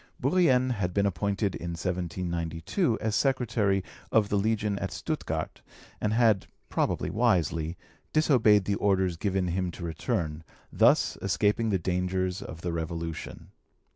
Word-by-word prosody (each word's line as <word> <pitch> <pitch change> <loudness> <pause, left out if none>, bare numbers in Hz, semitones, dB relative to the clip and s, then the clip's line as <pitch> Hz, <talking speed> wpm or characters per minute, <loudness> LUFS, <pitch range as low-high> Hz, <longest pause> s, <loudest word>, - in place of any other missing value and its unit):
Bourrienne 130 -4 +3
had 90 -7 -2
been 100 0 +3
appointed 100 +2 0
in 85 0 -5
1792 85 - -2
as 110 -1 -1
secretary 115 -8 +1 0.3
of 105 -2 +3
the - - +1
Legation 105 -1 0
at - - -3
Stuttgart, - - -4 0.4
and 105 - +1
had, 110 -4 +3 0.2
probably - - 0
wisely, 85 -6 +1 0.3
disobeyed 115 -10 +4
the 100 - 0
orders 95 -3 +1
given 95 0 -1
him 90 +1 -1
to 85 - -8
return, 80 -3 -2 0.3
thus - - +4
escaping 110 +2 +1
the 100 - +2
dangers 90 +1 -1
of 80 - -8
the 85 -1 -2
Revolution. 80 0 -5
95 Hz, 135 wpm, -28 LUFS, 85-110 Hz, 0.4 s, disobeyed